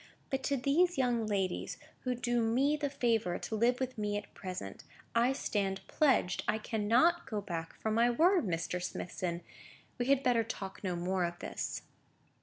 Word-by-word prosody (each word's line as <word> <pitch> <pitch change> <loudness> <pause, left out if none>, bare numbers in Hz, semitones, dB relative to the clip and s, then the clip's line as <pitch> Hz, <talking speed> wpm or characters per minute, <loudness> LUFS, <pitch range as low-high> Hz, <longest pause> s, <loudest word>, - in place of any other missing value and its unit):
But 270 0 0
to 280 - +1
these 315 +7 +3
young 240 -4 +1
ladies, 195 -3 -1 0.3
who 250 -1 +1
do 240 0 0
me 255 +6 +3
the 290 -1 -1
favour 230 -9 +1
to 220 - -4
live 240 +3 +3
with 255 -3 -3
me 205 0 0
at 205 - -8
present, 180 - -6 0.3
I 235 +2 +4
stand 195 -7 -1
pledged. 265 -11 +2
I 210 - +2
cannot 230 +11 +2
go 215 - -2
back 170 -5 -5
from 220 - -1
my 235 +2 +4
word, 345 +10 +4
Mr. 175 +1 -1
Smithson. 175 -1 -3 0.6
We 245 - 0
had 275 0 +4
better 240 -3 +3
talk 195 -3 -6
no 185 -2 -1
more 180 +1 0
of 175 0 -2
this." - - -4
225 Hz, 175 wpm, -33 LUFS, 190-255 Hz, 0.6 s, I